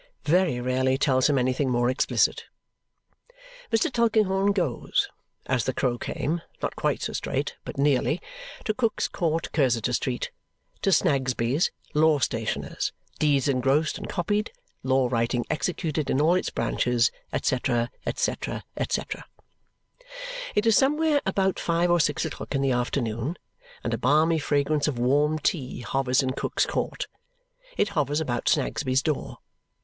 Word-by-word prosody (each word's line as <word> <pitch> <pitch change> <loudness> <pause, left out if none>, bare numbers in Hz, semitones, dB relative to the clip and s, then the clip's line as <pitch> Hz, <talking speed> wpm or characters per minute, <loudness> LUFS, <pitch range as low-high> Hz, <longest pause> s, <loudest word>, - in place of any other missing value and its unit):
Very 170 -5 +3
rarely 130 +1 +1
tells 130 0 +3
him 145 - +3
anything 130 +2 +1
more 120 -1 +2
explicit. 130 +1 +1 1.3
Mr. 240 +6 +2
Tulkinghorn 205 -4 +3
goes, 175 - 0 0.4
as 125 -3 0
the 130 - -1
crow 120 -2 0
came 165 +3 -2 0.2
not - - -3
quite - - -1
so - - -3
straight, - - -2
but - - -7
nearly 145 +3 +2 0.5
to 215 - +1
Cook's 230 -1 0
Court, 165 -2 -1
Cursitor 125 -5 +1
Street. 125 0 -1 0.5
To 195 - +2
Snagsby's, 135 -4 +2 0.2
Law 155 0 +4
Stationer's, 115 -4 -2 0.3
Deeds 145 -3 +3
engrossed 135 +3 +1
and - - -7
copied, 205 - -1 0.3
Law 130 -1 +2
Writing 120 0 0
executed 155 -1 -1
in 130 - +2
all 160 +4 +4
its 185 - 0
branches, 120 -2 +1 0.3
&c., 130 - +2
&c., 120 -2 0 1.0
&c. - - +1 1.5
It 210 - +2
is 225 -2 +5
somewhere 300 +1 +3
about 190 -1 +1
five 170 +1 +1
or 175 - +4
six 150 -1 +1
o'clock - - -5
in 135 - +1
the 135 - +2
afternoon, 120 +4 -1 0.5
and - - -1
a - - -1
balmy 155 +5 +3
fragrance 145 +1 +1
of 140 -5 -1
warm 145 +5 +2
tea 140 -4 -2
hovers 130 +1 +1
in 130 - 0
Cook's - - 0
Court. - - -2 0.7
It 205 - +2
hovers 150 -5 0
about 120 -7 -1
Snagsby's 135 -3 +1
door. 155 -4 -2
145 Hz, 140 wpm, -26 LUFS, 130-170 Hz, 1.5 s, is